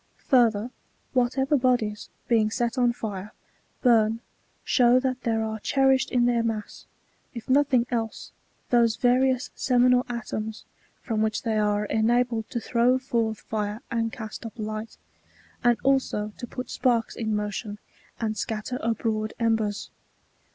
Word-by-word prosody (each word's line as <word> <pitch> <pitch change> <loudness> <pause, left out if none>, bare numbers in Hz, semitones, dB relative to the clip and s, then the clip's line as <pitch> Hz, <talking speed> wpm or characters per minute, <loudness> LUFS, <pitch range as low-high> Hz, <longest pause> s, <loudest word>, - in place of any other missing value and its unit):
Further, 235 -3 +3 0.4
whatever 265 +3 +2
bodies, 245 -5 0 0.2
being 220 -3 +3
set 235 +2 -1
on 245 -2 +3
fire, 210 -3 -6 0.5
burn, 225 -2 +4 0.4
show 245 0 +4
that 255 -1 -2
there 225 -2 0
are 220 0 -3
cherished 265 +3 +2
in 245 -1 +2
their 240 -1 +2
mass, 225 -2 -4 0.5
if 235 - -7
nothing 265 -3 +3
else, 225 -2 -3 0.4
those 235 -2 +4
various 255 +1 +2
seminal 250 0 +3
atoms, 220 -2 -5 0.4
from 220 -2 -1
which 220 -1 0
they 225 -1 0
are 210 0 +1
enabled 230 +1 +1
to 235 - -2
throw 240 +2 +2
forth 230 -4 -1
fire 210 +2 -3
and 230 -1 0
cast 220 -1 -7
up 225 0 -8
light, 215 0 -5 0.7
and 240 -1 +4
also 260 -6 +1
to 245 - -5
put 250 +1 -6
sparks 235 -3 +1
in 220 -2 -1
motion, 210 0 -3 0.4
and 220 -2 -2
scatter 225 +3 -3
abroad 220 -1 -1
embers. 220 -3 0
230 Hz, 135 wpm, -26 LUFS, 215-250 Hz, 0.7 s, burn